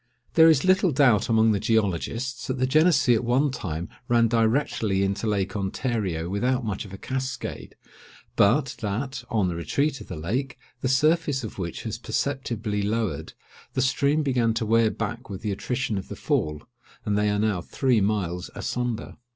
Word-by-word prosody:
There 165 Hz, 0 st, +7 dB
is 155 Hz, -2 st, +3 dB
little 185 Hz, -1 st, +4 dB
doubt 125 Hz, -7 st, +3 dB
among 110 Hz, -1 st, +4 dB
the 100 Hz, -, +1 dB
geologists, 115 Hz, +4 st, -1 dB
that 130 Hz, -, -2 dB
the 130 Hz, -, +2 dB
Genessee 155 Hz, -2 st, +4 dB
at 115 Hz, -, +1 dB
one 130 Hz, +4 st, +2 dB
time 85 Hz, -, -4 dB, 0.2 s
ran 120 Hz, -1 st, +4 dB
directly 115 Hz, -3 st, +1 dB
into 100 Hz, +3 st, -1 dB
Lake 100 Hz, -1 st, -1 dB
Ontario 95 Hz, -4 st, -2 dB
without 125 Hz, +6 st, 0 dB
much 105 Hz, -2 st, -3 dB
of 100 Hz, -, -11 dB
a 95 Hz, -, -7 dB
cascade, 130 Hz, +4 st, -5 dB, 0.6 s
but 120 Hz, +6 st, +3 dB
that, 125 Hz, +5 st, -3 dB
on 105 Hz, -5 st, +1 dB
the 90 Hz, -, -1 dB
retreat 135 Hz, -, -1 dB
of -, -, -10 dB
the -, -, -6 dB
lake, 120 Hz, -, -3 dB, 0.2 s
the 130 Hz, -, -1 dB
surface 145 Hz, 0 st, +2 dB
of 110 Hz, -, -7 dB
which 85 Hz, -3 st, -4 dB
has -, -, -4 dB
perceptibly 115 Hz, -7 st, -2 dB
lowered, 105 Hz, -6 st, -2 dB, 0.4 s
the 130 Hz, -, 0 dB
stream 140 Hz, +3 st, +2 dB
began 120 Hz, -5 st, +1 dB
to 115 Hz, -, -1 dB
wear 115 Hz, 0 st, +4 dB
back 115 Hz, +3 st, -5 dB
with 100 Hz, +1 st, -7 dB
the 105 Hz, -, -1 dB
attrition 120 Hz, +1 st, -2 dB
of 95 Hz, -, -9 dB
the -, -, -7 dB
fall, 75 Hz, -1 st, -1 dB, 0.4 s
and 105 Hz, -2 st, 0 dB
they 105 Hz, 0 st, +2 dB
are 105 Hz, -, +1 dB
now 105 Hz, -4 st, 0 dB
three 125 Hz, +4 st, +1 dB
miles 95 Hz, -3 st, -1 dB
asunder. 125 Hz, -2 st, -3 dB
115 Hz, 175 wpm, -25 LUFS, 100-130 Hz, 0.6 s, There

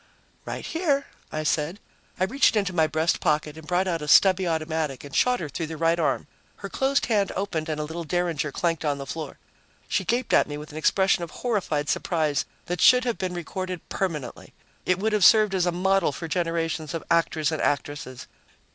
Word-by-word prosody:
"Right -, -, -5 dB
here," 305 Hz, -5 st, 0 dB, 0.3 s
I 155 Hz, -, -3 dB
said. 155 Hz, +5 st, -1 dB, 0.4 s
I -, -, +2 dB
reached 245 Hz, +6 st, +3 dB
into 200 Hz, -3 st, 0 dB
my 160 Hz, -3 st, +3 dB
breast 160 Hz, +2 st, 0 dB
pocket 150 Hz, -2 st, 0 dB
and 160 Hz, -1 st, -12 dB
brought 180 Hz, +2 st, +1 dB
out 170 Hz, -3 st, -1 dB
a 150 Hz, -, -5 dB
stubby 185 Hz, +4 st, +5 dB
automatic 160 Hz, -4 st, -2 dB
and 140 Hz, -2 st, -9 dB
shot 250 Hz, 0 st, +3 dB
her 165 Hz, -, -4 dB
through 160 Hz, +3 st, -4 dB
the 160 Hz, 0 st, -6 dB
right 165 Hz, +1 st, +2 dB
arm. -, -, 0 dB, 0.3 s
Her -, -, -8 dB
closed 270 Hz, +1 st, +1 dB
hand 205 Hz, -4 st, +1 dB
opened 170 Hz, -5 st, -2 dB
and 155 Hz, -1 st, -2 dB
a -, -, -1 dB
little 160 Hz, +3 st, -5 dB
derringer 165 Hz, -3 st, -1 dB
clanked 165 Hz, +2 st, -1 dB
on 145 Hz, -2 st, 0 dB
the 140 Hz, -, -6 dB
floor. 155 Hz, +1 st, -6 dB, 0.5 s
She -, -, 0 dB
gaped 240 Hz, +6 st, -1 dB
at -, -, +5 dB
me 145 Hz, -, -5 dB
with 150 Hz, +1 st, -9 dB
an 150 Hz, -, -8 dB
expression 190 Hz, +2 st, +2 dB
of 170 Hz, -, -5 dB
horrified 175 Hz, -10 st, -2 dB
surprise 155 Hz, -4 st, 0 dB, 0.2 s
that 175 Hz, -1 st, -3 dB
should 250 Hz, +1 st, +7 dB
have 240 Hz, -2 st, -1 dB
been 185 Hz, -1 st, -3 dB
recorded 180 Hz, +1 st, -5 dB
permanently; 165 Hz, -8 st, -4 dB, 0.3 s
it 185 Hz, -, +3 dB
would 215 Hz, +3 st, -1 dB
have 210 Hz, -3 st, +2 dB
served 215 Hz, +2 st, +6 dB
as 180 Hz, -2 st, +1 dB
a -, -, +2 dB
model 190 Hz, -1 st, +2 dB
for 165 Hz, +4 st, -6 dB
generations 165 Hz, -1 st, -2 dB
of 165 Hz, -, -4 dB
actors 165 Hz, -2 st, +2 dB
and 155 Hz, -, -2 dB
actresses. 145 Hz, -3 st, -2 dB
170 Hz, 205 wpm, -25 LUFS, 155-190 Hz, 0.5 s, should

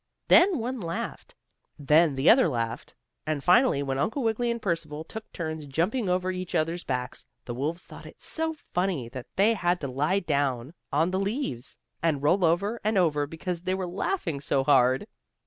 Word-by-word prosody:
Then 360 Hz, -1 st, +6 dB
one 250 Hz, +2 st, -3 dB
laughed, 170 Hz, -4 st, -5 dB, 0.4 s
then 150 Hz, +1 st, +4 dB
the 135 Hz, +3 st, 0 dB
other 250 Hz, -4 st, +7 dB
laughed, 115 Hz, -3 st, -4 dB, 0.3 s
and 150 Hz, -3 st, -1 dB
finally, 180 Hz, -, +4 dB
when 135 Hz, -1 st, -2 dB
Uncle 225 Hz, -, -1 dB
Wiggily 230 Hz, +1 st, 0 dB
and 235 Hz, 0 st, -1 dB
Percival 165 Hz, -6 st, -3 dB
took 220 Hz, +6 st, -9 dB
turns 160 Hz, -3 st, -5 dB
jumping 185 Hz, -, 0 dB
over 185 Hz, +1 st, +1 dB
each 185 Hz, -1 st, -5 dB
other's 165 Hz, +2 st, 0 dB
backs, 125 Hz, -1 st, -4 dB, 0.2 s
the 120 Hz, -, -5 dB
wolves 155 Hz, +8 st, -3 dB
thought -, -, -12 dB
it -, -, -14 dB
so 320 Hz, 0 st, -1 dB
funny 180 Hz, -, -3 dB
that 130 Hz, 0 st, -8 dB
they 210 Hz, +4 st, +4 dB
had 175 Hz, -4 st, 0 dB
to 140 Hz, -, -2 dB
lie 150 Hz, +9 st, +1 dB
down 140 Hz, -5 st, -1 dB, 0.2 s
on 160 Hz, +5 st, +2 dB
the 190 Hz, -, 0 dB
leaves 195 Hz, -, -3 dB, 0.2 s
and 155 Hz, -4 st, 0 dB
roll 180 Hz, +6 st, +3 dB
over 200 Hz, +8 st, +1 dB
and 215 Hz, 0 st, +1 dB
over 150 Hz, -5 st, +2 dB
because 165 Hz, +3 st, -4 dB
they 185 Hz, +1 st, -1 dB
were 190 Hz, -1 st, -3 dB
laughing 175 Hz, -, -2 dB
so 140 Hz, -1 st, +1 dB
hard. 130 Hz, -2 st, +4 dB
170 Hz, 180 wpm, -27 LUFS, 145-195 Hz, 0.4 s, other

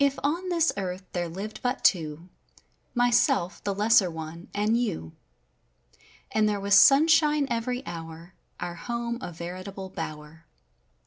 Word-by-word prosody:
ON 340 Hz, +6 st, -1 dB
this 335 Hz, -2 st, +2 dB
earth 185 Hz, -1 st, -4 dB
there 175 Hz, -1 st, -2 dB
lived 200 Hz, +6 st, -7 dB
but 250 Hz, 0 st, -2 dB
two 160 Hz, -2 st, +1 dB, 0.3 s
— -, -, -42 dB
my¬ 245 Hz, 0 st, +3 dB
self, 240 Hz, -, +2 dB
the 205 Hz, -, -1 dB
lesser 205 Hz, -2 st, +4 dB
one, 160 Hz, +1 st, -8 dB
and 210 Hz, +2 st, +1 dB
you. 200 Hz, -, -2 dB, 1.2 s
And 215 Hz, -1 st, +2 dB
there 205 Hz, -1 st, -1 dB
was 200 Hz, 0 st, 0 dB
sun¬ 275 Hz, +9 st, +7 dB
shine 300 Hz, -2 st, +4 dB
every 245 Hz, +3 st, -2 dB
hour, 165 Hz, +1 st, -8 dB, 0.3 s
our 175 Hz, -1 st, -4 dB
home 235 Hz, +6 st, -4 dB
averitable 185 Hz, 0 st, -7 dB
bower. 155 Hz, -1 st, -7 dB
200 Hz, 140 wpm, -27 LUFS, 170-245 Hz, 1.2 s, sun¬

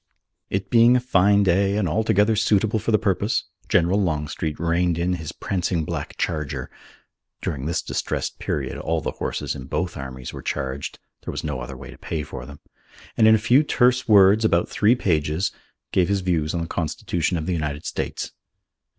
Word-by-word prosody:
It 95 Hz, 0 st, -3 dB
being 120 Hz, +1 st, +6 dB
a -, -, +4 dB
fine 100 Hz, -4 st, +3 dB
day 100 Hz, +2 st, +2 dB
and 105 Hz, -4 st, +1 dB
altogether 105 Hz, +3 st, +2 dB
suitable 110 Hz, +1 st, +2 dB
for 105 Hz, -, -4 dB
the 110 Hz, -, +5 dB
purpose, 105 Hz, +1 st, 0 dB, 0.3 s
General 90 Hz, +4 st, +3 dB
Longstreet 75 Hz, -3 st, -2 dB
reined 85 Hz, +1 st, +1 dB
in 90 Hz, +2 st, 0 dB
his 80 Hz, -4 st, -4 dB
prancing 90 Hz, -4 st, -2 dB
black 75 Hz, -3 st, -5 dB
charger 70 Hz, -5 st, -3 dB, 0.7 s
(during 70 Hz, -2 st, -3 dB
this 85 Hz, -, -1 dB
distressed -, -, -3 dB
period -, -, -3 dB
all 80 Hz, 0 st, -1 dB
the -, -, -2 dB
horses -, -, -3 dB
in 65 Hz, -, -8 dB
both 90 Hz, +6 st, -2 dB
armies 65 Hz, -2 st, -7 dB
were -, -, -7 dB
charged: 65 Hz, 0 st, -4 dB, 0.3 s
there -, -, -4 dB
was -, -, -5 dB
no 75 Hz, -5 st, -3 dB
other 60 Hz, -, -7 dB
way -, -, -10 dB
to -, -, -14 dB
pay 80 Hz, -2 st, -3 dB
for 65 Hz, -4 st, -8 dB
them), 70 Hz, 0 st, -11 dB, 0.6 s
and 110 Hz, -, +5 dB
in 110 Hz, -, +8 dB
a 110 Hz, 0 st, -2 dB
few 130 Hz, +5 st, +6 dB
terse 125 Hz, -4 st, +2 dB
words, 105 Hz, 0 st, +6 dB
about 85 Hz, -6 st, +2 dB
three 110 Hz, +4 st, +3 dB
pages, 80 Hz, -, 0 dB, 0.4 s
gave 90 Hz, -1 st, +2 dB
his 100 Hz, -1 st, +1 dB
views 85 Hz, -3 st, 0 dB
on 85 Hz, -, -1 dB
the 85 Hz, -, -3 dB
Constitution 85 Hz, +2 st, -2 dB
of 80 Hz, -, -3 dB
the 90 Hz, -, -1 dB
United 75 Hz, -2 st, -3 dB
States. -, -, -4 dB
90 Hz, 185 wpm, -23 LUFS, 75-105 Hz, 0.7 s, in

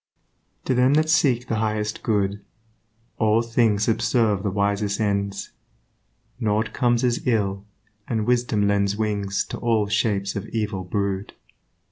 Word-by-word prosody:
To -, -, +1 dB
them 130 Hz, +3 st, +4 dB
that 155 Hz, +1 st, +2 dB
seek 130 Hz, -6 st, +2 dB
the 115 Hz, -, -1 dB
highest 105 Hz, -1 st, -2 dB
good 100 Hz, -2 st, 0 dB, 0.8 s
All 110 Hz, +1 st, +3 dB
things 115 Hz, -3 st, +2 dB
subserve 110 Hz, -2 st, +1 dB
the 100 Hz, -, -1 dB
wisest 100 Hz, +1 st, 0 dB
ends; 100 Hz, -2 st, -1 dB, 0.9 s
Nought 110 Hz, -1 st, 0 dB
comes 120 Hz, -1 st, +1 dB
as 120 Hz, -1 st, +1 dB
ill, 100 Hz, -4 st, 0 dB, 0.4 s
and 110 Hz, -3 st, -1 dB
wisdom 120 Hz, -4 st, +1 dB
lends 100 Hz, 0 st, +1 dB
Wings 100 Hz, -2 st, -1 dB
to -, -, -5 dB
all 115 Hz, -3 st, +1 dB
shapes 100 Hz, -2 st, 0 dB
of 100 Hz, +1 st, -4 dB
evil 105 Hz, -4 st, -2 dB
brood. 100 Hz, +1 st, -2 dB
105 Hz, 135 wpm, -23 LUFS, 100-115 Hz, 0.9 s, them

